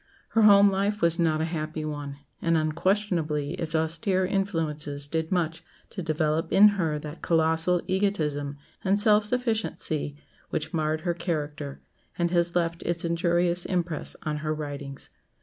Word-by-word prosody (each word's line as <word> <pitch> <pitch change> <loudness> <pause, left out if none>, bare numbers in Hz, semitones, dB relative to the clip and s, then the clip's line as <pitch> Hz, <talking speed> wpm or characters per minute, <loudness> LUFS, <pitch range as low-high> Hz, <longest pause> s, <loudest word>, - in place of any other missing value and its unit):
Her 225 - +2
home 200 -1 +7
life 200 +2 0
was 170 0 +2
not 160 -2 +2
a - - +1
happy 155 0 -3
one, 145 -2 -5 0.2
and 165 -1 +2
unquestionably 160 -2 0
its 165 -3 -3
austere 165 +4 +1
influences 160 -7 -1
did 160 +2 -2
much 165 -3 -1 0.3
to 190 - -5
develop 155 0 0
in 210 +2 +8
her 165 -7 -1
that 150 +2 -8
colossal 165 +2 +2
egotism 155 -8 -1 0.3
and 195 +1 +2
self 210 0 +5
sufficiency 220 - -1 0.3
which 155 +3 -3
marred 155 -1 0
her 175 0 0
character, 150 -4 -4 0.4
and 170 -1 0
has 170 -1 +2
left 170 -1 0
its 170 0 -1
injurious 170 +1 +1
impress 175 -4 -1
on 150 -1 -2
her 155 0 -2
writings. 145 -2 -5
165 Hz, 150 wpm, -26 LUFS, 155-185 Hz, 0.4 s, in